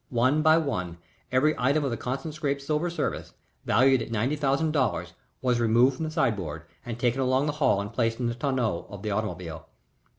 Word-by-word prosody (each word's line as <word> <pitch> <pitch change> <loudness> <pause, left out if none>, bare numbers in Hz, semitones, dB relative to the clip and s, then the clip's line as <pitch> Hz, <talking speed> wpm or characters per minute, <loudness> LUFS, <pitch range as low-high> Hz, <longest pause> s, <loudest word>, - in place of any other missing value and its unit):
One 130 +5 +2
by 160 0 +5
one 90 - -2 0.3
every 140 +4 +3
item 140 +5 +2
of 135 - -1
the - - -1
Constant 135 +6 -4
Scrappe's 140 -2 -2
silver 155 +4 0
service, 170 - -3 0.3
valued 130 0 +4
at - - -5
ninety 115 +6 0
thousand 145 +2 +1
dollars, 130 - 0 0.3
was 125 -2 +2
removed 120 +3 +4
from 160 - -3
the - - -3
sideboard 100 - -1 0.2
and 120 -2 -5
taken 125 +2 +1
along 130 +2 +2
the 150 - 0
hall 100 -7 +4
and 100 0 -5
placed 115 -1 0
in 125 - -1
the 120 - 0
tonneau 120 - -1
of 100 0 -9
the 105 - -2
automobile. 90 -6 -4
130 Hz, 200 wpm, -27 LUFS, 110-140 Hz, 0.3 s, by